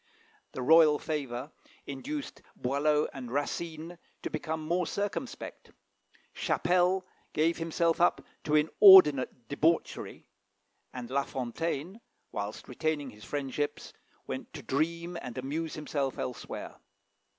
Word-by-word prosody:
The 130 - -4
royal 155 +1 +7
favour 145 -3 -4 0.3
induced 280 - -5
Boileau 150 +4 +1
and 130 -3 -7
Racine 160 +5 -3 0.2
to - - -3
become 160 -1 -3
more 175 0 +1
circumspect; 205 +5 -4 0.6
Chapelle 180 +1 +2 0.3
gave 165 +2 +2
himself 165 0 +1
up 175 - +3 0.2
to 150 - +2
inordinate 150 - +7
debauchery; 160 +5 0 0.7
and 125 -1 -7
La 140 +1 +2
Fontaine, 160 - -4 0.3
whilst 105 +1 -5
retaining 145 +1 -2
his 105 0 -14
friendships, 145 0 -3 0.3
went - - -6
to - - -8
dream 170 +4 -1
and 125 +1 -7
amuse 150 +5 -3
himself 145 -3 -2
elsewhere. 125 - -6
155 Hz, 110 wpm, -30 LUFS, 135-170 Hz, 0.7 s, royal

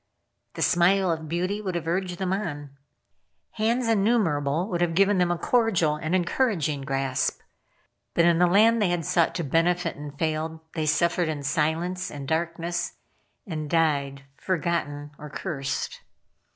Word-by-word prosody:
The - - -1
smile 180 +1 +3
of 160 -1 -4
beauty 185 +5 -1
would 185 -4 -3
have 170 -2 -2
urged 180 +1 -1
them 190 0 -1
on. 145 -8 -4 0.8
Hands 230 +3 0
innumerable 190 -8 +2
would 175 -2 -2
have 170 -1 +1
given 195 +1 +4
them 180 -1 +3
a 175 - 0
cordial 185 -7 +2
and 155 +3 -1
encouraging 175 - 0
grasp. 135 -1 -1 0.8
But 170 - +4
in 170 -1 +4
the 180 - +5
land 220 +5 +5
they 200 - +3
had 175 -2 -1
sought 170 +1 +2
to 170 - -1
benefit 170 +4 +1
and 145 -1 -9
failed, 160 +1 -2
they 155 -2 -2
suffered 170 +2 +2
in 150 -2 -3
silence 165 +5 -1
and 140 -2 -7
darkness, 170 +2 -2 0.5
and 155 -6 -5
died 140 -4 +1
forgotten 150 -5 -2
or 150 0 -8
cursed. 140 -4 -4
170 Hz, 150 wpm, -26 LUFS, 150-185 Hz, 0.8 s, the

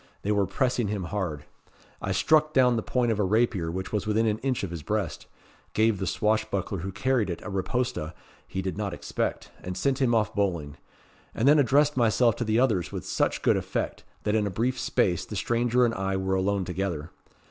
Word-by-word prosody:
They 105 - 0
were 100 -2 +2
pressing 125 +2 0
him 100 -2 -2
hard. 85 -5 -3 0.6
I - - -2
struck 155 -1 +3
down 125 -2 +4
the 115 - 0
point 120 +1 0
of 110 - -1
a - - +3
rapier 105 -4 +1
which 95 +4 -5
was 105 -1 -1
within 110 +1 +2
an 110 0 0
inch 130 -3 -1
of 95 - -3
his 85 -3 -5
breast - - -3 0.5
gave 110 -2 +2
the 95 - -2
swashbuckler 105 -3 0
who 95 +3 -4
carried 115 +1 0
it 85 - -3
a 105 - -6
riposta 100 -3 -2 0.3
he 95 0 -4
did 95 +1 -3
not 100 -3 -2
expect, - - -3
and 90 0 -5
sent 135 +7 0
him 120 -3 +3
off 110 -2 +1
bowling 85 -8 -1 0.6
and 115 - +1
then 150 +1 +7
addressed 145 +2 +3
myself 115 0 +3
to - - -1
the 110 0 +2
others 110 -10 +1
with - - -5
such - - 0
good - - +4
effect, - - -3 0.2
that 105 - 0
in 105 -2 +2
a - - -1
brief 120 +6 -1
space 90 -6 +1
the 105 - -7
stranger 120 +3 +2
and 115 - 0
I 95 -2 -1
were 95 0 -1
alone 95 0 +1
together. 90 -4 -3
105 Hz, 210 wpm, -27 LUFS, 95-120 Hz, 0.6 s, then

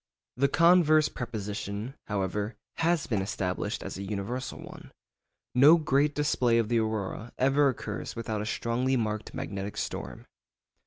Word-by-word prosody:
The 140 +2 +3
converse 160 -1 +5
proposition, 105 -1 -5
however, 105 +1 -2 0.2
has 165 -2 +2
been 110 -6 0
established 95 -1 -2
as - - -6
an 100 - -4
universal 105 +6 -4
one. - - -11 0.6
No 145 +7 +8
great 145 -2 +2
display 125 -5 +2
of 115 -2 +1
the 120 -1 +3
aurora 110 +1 -3
ever 135 +2 +4
occurs 130 - -5
without 110 -2 -3
a 105 - -4
strongly 125 +4 0
marked 110 -2 -3
magnetic 100 +1 -5
storm. - - -5
115 Hz, 140 wpm, -28 LUFS, 105-135 Hz, 0.6 s, No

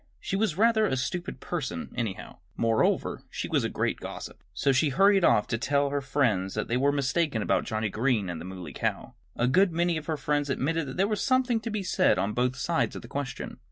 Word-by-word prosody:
She 195 - -3
was 195 -5 0
rather 220 0 +4
a 130 - 0
stupid 175 +8 -3
person, 130 - -4
anyhow. 115 -6 -4 0.2
Moreover, 115 -1 +1
she - - -4
was - - +1
a - - 0
great - - -1
gossip. - - -8
So 120 +10 +1
she 145 +3 +3
hurried 195 +6 +4
off 105 - +4
to 115 - -1
tell 140 +3 +2
all 140 - 0
her 145 0 0
friends 120 -10 0
that 105 - -2
they 120 - 0
were 140 +3 +3
mistaken 140 -3 0
about - - +1
Johnnie 110 0 -1
Green 110 -3 +1
and 85 -2 -5
the - - -7
Muley 90 -5 -8
Cow. - - -3 0.2
A 120 - +1
good 180 +8 +4
many 170 0 +1
of 155 - -7
her 160 -2 -1
friends 145 -1 0
admitted 150 +3 0
that 130 - -7
there 195 +2 +3
was 215 -1 -1
something 255 -3 +2
to 230 - -5
be 210 -2 -2
said 185 0 +3
on 105 +2 0
both 125 +2 0
sides 170 +4 0
of - - -7
the - - -9
question. 140 -3 -5
140 Hz, 230 wpm, -27 LUFS, 115-175 Hz, 0.2 s, rather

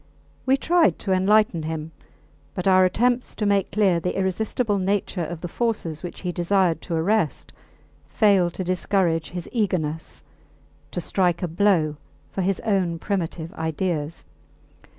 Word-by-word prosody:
We 265 +1 +4
tried 340 +3 +3
to 195 - -3
enlighten 190 -1 +3
him, 160 0 -4 0.6
but 185 0 -2
our 185 -1 +6
attempts 245 +6 +1
to 215 - -2
make 200 -2 +2
clear 195 -5 +3
the 180 +2 -2
irresistible 205 +3 0
nature 190 -1 -1
of 165 +1 -6
the 175 - -4
forces 175 -7 -2
which 175 - -7
he 180 - -2
desired 175 -1 +1
to 170 - -3
arrest 165 -2 0 0.5
failed 190 -5 +3
to 185 - -3
discourage 180 -2 0
his 175 -1 -6
eagerness 160 - -2 0.7
to 175 - -3
strike 180 -1 0
a - - +1
blow 165 -4 +2 0.3
for 190 - -2
his 190 0 0
own 190 -6 0
primitive 165 -3 -3
ideas. 160 -1 -3
185 Hz, 145 wpm, -24 LUFS, 165-200 Hz, 0.7 s, our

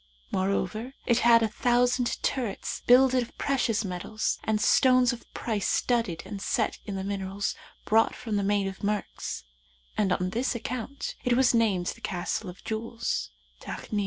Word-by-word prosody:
Moreover, 200 +6 -1
it 235 0 +3
had 230 -1 +6
a - - +3
thousand 245 +2 +2
turrets 240 -7 -2
builded 255 +1 +6
of 235 - -8
precious 230 -6 +1
metals, 185 +4 -2
and 215 -1 +1
stones 255 +2 +5
of 235 - -11
price 215 -4 -1
studded 230 -9 0
and 200 0 -6
set - - 0
in 200 - -3
the 190 - -3
minerals 195 0 -2 0.3
brought 225 +1 +3
from 220 -3 -4
the 200 - +1
Main 200 0 +1
of 190 0 -6
Murks, 210 0 -3 0.5
and 200 -3 +1
on 180 0 0
this 240 +4 0
account 250 +3 -4
it 250 - +2
was 260 -1 +4
named 210 -6 +2
the 230 - -18
Castle 185 0 -2
of 180 - -12
Jewels, 230 +1 -2 0.3
Takni. 210 - -4
220 Hz, 160 wpm, -28 LUFS, 195-245 Hz, 0.5 s, had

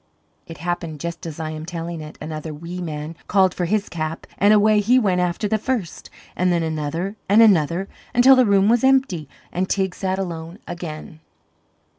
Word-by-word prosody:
It 165 -1 -9
happened 170 -2 -4
just 170 +1 -5
as 160 0 -7
I 155 -1 -3
am 155 0 -6
telling 170 -1 -5
it. 150 0 -10
Another 155 0 -6
wee 170 +4 -7
man 155 -1 -5
called 190 -2 +3
for 180 - -2
his 205 +3 0
cap, 160 -1 -4
and 205 +1 +5
away 215 0 +5
he 230 +5 +4
went 190 -7 +2
after 180 +4 -1
the 220 +1 0
first. 220 -7 -3 0.3
And 180 0 +1
then 170 -1 +1
another 160 +6 -3
and 205 +3 +6
another 185 -4 +4 0.2
until 255 +2 +7
the 255 -3 +4
room 200 -1 +4
was 235 +2 +3
empty 265 - +2 0.2
and 185 +1 -2
Teig 190 -2 0
sat 190 0 -2
alone 170 -2 -5
again. 160 -2 -7
175 Hz, 185 wpm, -22 LUFS, 160-200 Hz, 0.3 s, until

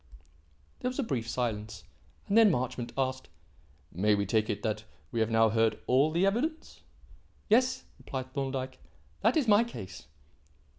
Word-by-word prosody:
There 250 - -1
was 255 - -7
a 280 - +1
brief 120 - -3
silence, 110 -4 -3 0.4
and 200 - 0
then 225 -2 +7
Marchmont 130 -5 -2
asked: 130 -1 -2 0.6
"May 105 +4 +2
we 100 0 0
take 110 +2 +1
it 105 -1 -3
that 110 -1 -2 0.3
we 115 - -2
have 110 0 +2
now 115 0 +4
heard 115 0 +2
all 135 +4 +4
the 170 +4 +2
evidence?" 280 +11 -2 0.7
"Yes," 250 +4 +3 0.2
replied 130 -1 -6
Thorndyke. 135 -2 -3 0.4
"That - - +3
is 285 -6 +1
my 210 +1 +6
case." 95 - -9
130 Hz, 155 wpm, -30 LUFS, -, 0.7 s, then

